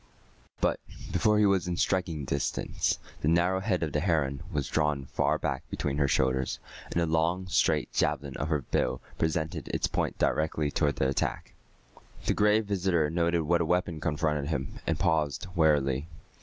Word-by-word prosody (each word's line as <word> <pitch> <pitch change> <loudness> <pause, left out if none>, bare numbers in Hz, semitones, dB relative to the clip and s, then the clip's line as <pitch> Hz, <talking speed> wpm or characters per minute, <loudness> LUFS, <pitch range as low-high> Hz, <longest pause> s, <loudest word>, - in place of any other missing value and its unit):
But, - - +2 0.3
before 105 +4 +3
he 105 - +5
was 100 -3 +3
within 90 -1 -2
striking 85 -7 0
distance, 70 +1 -1 0.2
the - - 0
narrow 85 +3 +3
head 95 -3 0
of 80 - -2
the 75 - 0
heron 75 -5 0
was 70 -4 -1
drawn 75 -3 0
far - - +1
back - - -2
between 70 -1 -2
her 70 - +3
shoulders, 65 -1 +1 0.3
and - - 0
the 85 - +2
long 80 +3 +1
straight 95 - +1
javelin 70 -1 0
of 75 - -2
her 75 -4 0
bill - - 0 0.2
presented 80 -1 -1
its - - 0
point - - -1
directly 75 -1 0
toward 75 -2 +1
the 65 - +1
attack. 70 - -2 0.7
The - - +2
Gray 105 +1 +4
Visitor 95 -7 +1
noted 85 0 +1
what 85 +2 +2
a - - +1
weapon 90 -1 0
confronted 75 -1 0
him, 70 -4 -3
and 80 - +1
paused 80 0 +1
warily. 75 -4 +2
80 Hz, 170 wpm, -29 LUFS, 75-90 Hz, 0.7 s, he